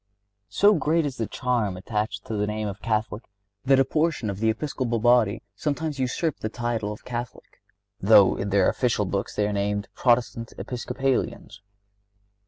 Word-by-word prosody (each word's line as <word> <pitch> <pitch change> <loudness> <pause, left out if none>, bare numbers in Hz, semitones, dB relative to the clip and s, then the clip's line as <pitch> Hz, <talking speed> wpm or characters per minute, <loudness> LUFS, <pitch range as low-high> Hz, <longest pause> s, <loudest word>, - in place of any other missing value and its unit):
So 205 - +5
great 160 -2 +1
is 135 -2 -4
the 115 - -2
charm 115 -7 -1
attached 105 +1 -3
to - - -5
the 105 0 0
name 105 0 -2
of 100 0 -6
Catholic 110 0 -1 0.4
that 135 0 +5
a 135 - +4
portion 155 -6 0
of 100 - -7
the 110 +1 +2
Episcopal 120 0 -1
body 120 -2 +3
sometimes 150 +3 -2
usurp 130 +4 -1
the 110 - -3
title 115 -3 -2
of 105 - -10
Catholic, 120 0 -7 0.4
though - - +6
in 100 - -3
their 100 -1 +3
official 120 -5 +1
books 100 +1 -3
they 105 -1 +1
are 105 - -2
named 100 0 -1
Protestant 120 -2 +1
Episcopalians. 125 -3 -3
115 Hz, 165 wpm, -25 LUFS, 105-130 Hz, 0.4 s, though